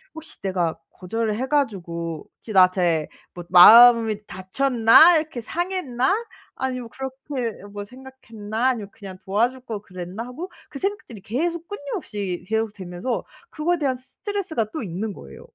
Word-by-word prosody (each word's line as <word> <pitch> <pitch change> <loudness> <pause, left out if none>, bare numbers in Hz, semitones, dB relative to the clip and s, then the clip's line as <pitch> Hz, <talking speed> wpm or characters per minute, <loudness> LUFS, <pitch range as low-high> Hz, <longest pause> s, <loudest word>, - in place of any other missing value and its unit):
혹시 320 0 -12
내가 180 -4 -1
거절을 215 +4 -3
해 255 +4 -3
가지고 170 - -2
혹시 220 - -10
나한테 180 -4 +3 0.3
뭐 175 - -7
마음이 220 +3 +8
닫혔나? 240 - +5
이렇게 310 -5 -3
상했나?' 335 - -1 0.4
아니면 255 -3 -4
'그렇게 265 -4 -5
뭐 205 0 -6
생각했나?' 245 -2 -4
아니면 220 -6 -3
'그냥 195 -4 -11
도와줄 235 +7 0
걸 220 -5 -6
그랬나?' 185 +3 -7
하고 310 +10 -7 0.2
그 275 - -8
생각들이 380 - -4
계속 335 - -3
끊임없이 205 - -5
계속되면서 210 0 -3 0.3
그거에 340 +3 0
대한 275 -4 0
스트레스가 325 - -4
또 315 - -4
있는 200 +2 -4
거예요. 70 - -12
230 Hz, 330 characters per minute, -23 LUFS, 195-270 Hz, 0.4 s, 마음이